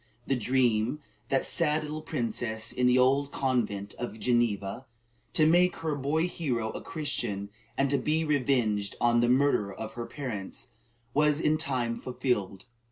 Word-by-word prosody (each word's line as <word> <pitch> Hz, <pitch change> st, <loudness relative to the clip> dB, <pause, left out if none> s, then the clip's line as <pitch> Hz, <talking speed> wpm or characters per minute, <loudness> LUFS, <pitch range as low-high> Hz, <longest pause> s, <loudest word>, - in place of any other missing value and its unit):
The 135 Hz, -, +1 dB
dream 120 Hz, -2 st, +2 dB
of -, -, -8 dB, 0.3 s
that 135 Hz, -, +1 dB
sad 155 Hz, -2 st, +2 dB
little 155 Hz, +1 st, -5 dB
princess 120 Hz, -6 st, -2 dB
in 125 Hz, 0 st, +2 dB
the 125 Hz, 0 st, +5 dB
old 135 Hz, +2 st, +3 dB
convent 105 Hz, -7 st, -1 dB
at 120 Hz, -, -3 dB
Geneva, 120 Hz, -1 st, 0 dB, 0.5 s
"to 155 Hz, -, +4 dB
make 175 Hz, +3 st, +4 dB
her 160 Hz, -2 st, -2 dB
boy 145 Hz, +4 st, 0 dB
hero 125 Hz, -11 st, -2 dB
a -, -, -6 dB
Christian, 105 Hz, -10 st, -3 dB, 0.3 s
and 140 Hz, -, +3 dB
to 140 Hz, -, +2 dB
be 155 Hz, +4 st, +1 dB
revenged 125 Hz, -8 st, +1 dB
on 120 Hz, 0 st, +3 dB
the 120 Hz, 0 st, +3 dB
murderer 125 Hz, -6 st, +3 dB
of 110 Hz, 0 st, -6 dB
her 120 Hz, 0 st, -5 dB
parents," 120 Hz, -10 st, -5 dB, 0.4 s
was 150 Hz, 0 st, +3 dB
in 155 Hz, -1 st, +3 dB
time 125 Hz, -7 st, -1 dB
fulfilled. 105 Hz, -7 st, -2 dB
125 Hz, 160 wpm, -29 LUFS, 110-150 Hz, 0.5 s, the